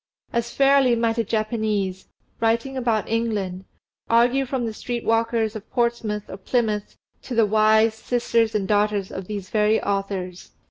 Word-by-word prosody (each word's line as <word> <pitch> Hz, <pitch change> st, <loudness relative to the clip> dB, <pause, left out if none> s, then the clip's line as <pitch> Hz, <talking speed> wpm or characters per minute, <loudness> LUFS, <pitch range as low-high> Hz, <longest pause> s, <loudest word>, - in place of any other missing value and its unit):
As 235 Hz, 0 st, -1 dB
fairly 275 Hz, -3 st, +4 dB
might 230 Hz, 0 st, 0 dB
a -, -, +2 dB
Japanese, 215 Hz, -3 st, -2 dB, 0.3 s
writing 230 Hz, +4 st, 0 dB
about 235 Hz, -4 st, 0 dB
England, 205 Hz, -5 st, -2 dB, 0.4 s
argue 245 Hz, +4 st, +3 dB
from 255 Hz, -2 st, -2 dB
the 225 Hz, -, -3 dB
street 240 Hz, +2 st, -5 dB
walkers 225 Hz, -1 st, +1 dB
of 220 Hz, 0 st, -8 dB
Portsmouth 235 Hz, -4 st, -1 dB
or 190 Hz, -, -8 dB
Plymouth 210 Hz, 0 st, -1 dB, 0.2 s
to 250 Hz, -, -6 dB
the 225 Hz, -1 st, +5 dB
wives, 220 Hz, +1 st, +3 dB
sisters, 230 Hz, -2 st, 0 dB
and 200 Hz, -2 st, 0 dB
daughters 205 Hz, -1 st, +1 dB
of 190 Hz, -1 st, -6 dB
these 200 Hz, -3 st, -6 dB
very 215 Hz, 0 st, +3 dB
authors. 195 Hz, -2 st, -4 dB
220 Hz, 150 wpm, -23 LUFS, 210-235 Hz, 0.4 s, the